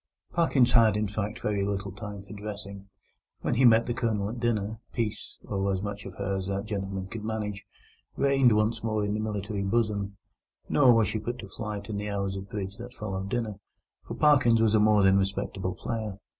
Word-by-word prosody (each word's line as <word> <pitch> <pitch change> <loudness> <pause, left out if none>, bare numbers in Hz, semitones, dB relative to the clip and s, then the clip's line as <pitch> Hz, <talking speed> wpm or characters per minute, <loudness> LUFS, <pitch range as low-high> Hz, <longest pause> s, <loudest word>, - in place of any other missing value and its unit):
Parkins 135 -8 +3
had, 110 -4 +5
in 105 0 0
fact, 105 +2 -4
very 105 -2 0
little 100 0 -2
time 100 0 -7
for 100 - -11
dressing. 100 -1 -7 0.5
When - - 0
he 130 +2 +4
met 115 -1 +6
the 120 - -1
Colonel 110 -4 0
at 120 - -6
dinner, 110 -2 -1
Peace—or 100 -3 -2
as 95 0 -1
much 100 -1 -5
of 90 - -9
her 100 0 -2
as 95 -1 -4
that 100 +1 -2
gentleman 95 -2 -3
could 110 +2 -7
manage—reigned 110 +4 0
once 110 +1 +1
more 110 -2 0
in 105 - -1
the 105 - -1
military 105 -1 -3
bosom; 100 -1 0 0.5
nor 135 -4 +5
was 115 -3 +4
she 110 - -1
put 120 +3 -4
to 100 - -8
flight 105 0 -5
in 105 -2 -3
the 105 +1 -3
hours 100 -1 -2
of 95 0 -7
bridge 100 -1 -5
that 120 +1 -9
followed 95 -2 -4
dinner, 110 -3 -2 0.4
for - - -6
Parkins 130 -6 +5
was 110 -1 +3
a 110 - +5
more 105 -1 +5
than 95 0 +6
respectable 95 -1 -2
player. 110 -1 -4
105 Hz, 200 wpm, -28 LUFS, 100-110 Hz, 0.5 s, met